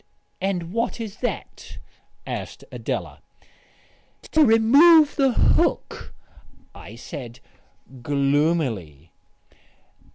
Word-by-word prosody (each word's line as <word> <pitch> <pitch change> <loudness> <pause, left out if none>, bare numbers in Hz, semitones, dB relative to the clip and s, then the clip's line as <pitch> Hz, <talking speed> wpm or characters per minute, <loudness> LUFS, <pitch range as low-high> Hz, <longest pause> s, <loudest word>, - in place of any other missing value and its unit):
"And 180 -2 -3
what 230 +1 -2
is 215 -3 -7
that?" 245 - -6 0.5
asked - - -7
Adela. - - -5 1.1
"To 315 - +4
remove 285 +7 +5
the 270 -3 +2
hook," - - 0 0.6
I 105 - -12
said 125 -1 -9 0.6
gloomily. 140 - -1
170 Hz, 75 wpm, -22 LUFS, -, 1.1 s, remove